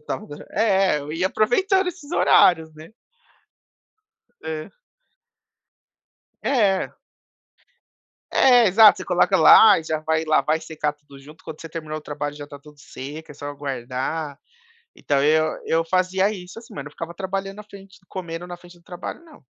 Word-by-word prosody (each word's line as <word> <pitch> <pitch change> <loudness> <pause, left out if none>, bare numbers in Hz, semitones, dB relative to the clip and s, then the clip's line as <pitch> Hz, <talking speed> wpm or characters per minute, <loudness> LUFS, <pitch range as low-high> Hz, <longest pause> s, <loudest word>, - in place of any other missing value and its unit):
estava 205 +7 -6 0.2
É, 195 -6 +2
eu 145 0 -8
ia 165 +4 -1
aproveitando 375 - +1
esses 345 -4 -7
horários, 160 - +4
né? 155 +1 -13 1.5
É. 160 -1 -6 1.7
É. 205 -8 +1 1.4
É, 245 -3 +5
exato. 210 +2 +7
Você - - -6
coloca - - +2
lá, 215 -2 +8
e - - -9
já 155 0 -2
vai 160 +1 -1
lá, 155 -1 +3
vai 155 +1 0
secar 150 -2 -3
tudo 145 -2 -17
junto, 150 +3 -16
quando 160 -1 -9
você 165 - -8
terminar 155 -1 -7
o - - -9
trabalho, 145 -1 -5
já 145 -1 -8
está 145 0 -11
tudo 150 +1 -18
seca, 145 +4 -9
é - - -20
só 145 0 -7
guardar. 140 +2 -5 0.6
Então, 140 -1 0
eu 155 +2 +2
eu 165 0 +1
fazia 185 +3 +1
isso, 185 -1 -9
assim, 230 0 -12
mas 140 - -6
não 145 - -10
ficava 165 +2 -7
trabalhando 195 +2 -5
na 210 - -9
frente 195 -2 -15
comendo 175 -2 -7
na 175 - -7
frente 175 0 -17
do 170 - -26
trabalho 175 - -8
não. 315 - -18
165 Hz, 160 wpm, -22 LUFS, 150-195 Hz, 1.7 s, lá